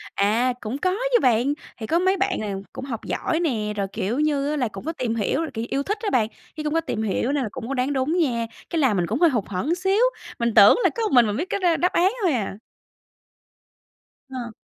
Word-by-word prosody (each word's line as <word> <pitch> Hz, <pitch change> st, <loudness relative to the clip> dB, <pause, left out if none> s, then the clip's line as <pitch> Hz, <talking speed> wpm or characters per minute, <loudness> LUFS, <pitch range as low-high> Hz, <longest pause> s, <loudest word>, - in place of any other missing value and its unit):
À, 225 Hz, +6 st, +2 dB
cũng 225 Hz, +5 st, -4 dB
có 370 Hz, +6 st, +1 dB, 0.2 s
chứ 485 Hz, -, +5 dB
bạn. 250 Hz, +3 st, +3 dB, 0.2 s
Thì 220 Hz, -2 st, -6 dB
có 335 Hz, -, +2 dB
mấy 375 Hz, +1 st, +2 dB
bạn 390 Hz, +1 st, 0 dB
nào 200 Hz, -2 st, -4 dB
cũng 265 Hz, -, -6 dB
học 230 Hz, -5 st, -5 dB
giỏi 320 Hz, -, -1 dB
nè, 225 Hz, -11 st, -1 dB
rồi, 200 Hz, -1 st, -1 dB
kiểu 220 Hz, +5 st, -2 dB
như 290 Hz, -2 st, +1 dB
á, 300 Hz, -, -1 dB
là 250 Hz, -4 st, +1 dB
cũng 195 Hz, +1 st, -9 dB
có 325 Hz, -, -2 dB
tìm 245 Hz, -6 st, -2 dB
hiểu 250 Hz, +8 st, 0 dB
là, 315 Hz, -, -4 dB
kiểu, 225 Hz, 0 st, -3 dB
yêu 275 Hz, -, -1 dB
thích 415 Hz, +8 st, -2 dB
á 435 Hz, -, -1 dB
bạn, 235 Hz, -, +2 dB, 0.3 s
với 305 Hz, -, -4 dB
cũng 300 Hz, 0 st, -1 dB
có 330 Hz, -, +2 dB
tìm 220 Hz, -8 st, -3 dB
hiểu 220 Hz, +5 st, 0 dB
nên 285 Hz, -3 st, 0 dB
là 215 Hz, -, -3 dB
cũng 250 Hz, -3 st, -7 dB
có 275 Hz, -, -3 dB
đoán 270 Hz, +2 st, 0 dB
đúng 275 Hz, +6 st, 0 dB
nha. 240 Hz, -8 st, +1 dB, 0.2 s
Cái 335 Hz, -, -1 dB
làm 255 Hz, -9 st, +3 dB
mình 175 Hz, -1 st, 0 dB
cũng 225 Hz, +8 st, -1 dB
hơi 345 Hz, -, +6 dB
hụt 235 Hz, -8 st, 0 dB
hẫng 205 Hz, -, -1 dB
xíu, 385 Hz, +4 st, +1 dB, 0.4 s
mình 235 Hz, -1 st, 0 dB
tưởng 200 Hz, -, +8 dB
là -, -, +5 dB
có 465 Hz, -, -1 dB
một 435 Hz, -, 0 dB
mình 245 Hz, -3 st, +6 dB
mình 205 Hz, 0 st, -2 dB
biết 355 Hz, +6 st, -3 dB
cái -, -, -1 dB
đ 370 Hz, -, -2 dB
đáp 360 Hz, -, +2 dB
án 370 Hz, +3 st, +3 dB
thôi 350 Hz, -5 st, +3 dB
à. 205 Hz, -5 st, -2 dB, 1.7 s
Ờ. 245 Hz, -3 st, -6 dB
260 Hz, 260 wpm, -23 LUFS, 220-325 Hz, 1.7 s, tưởng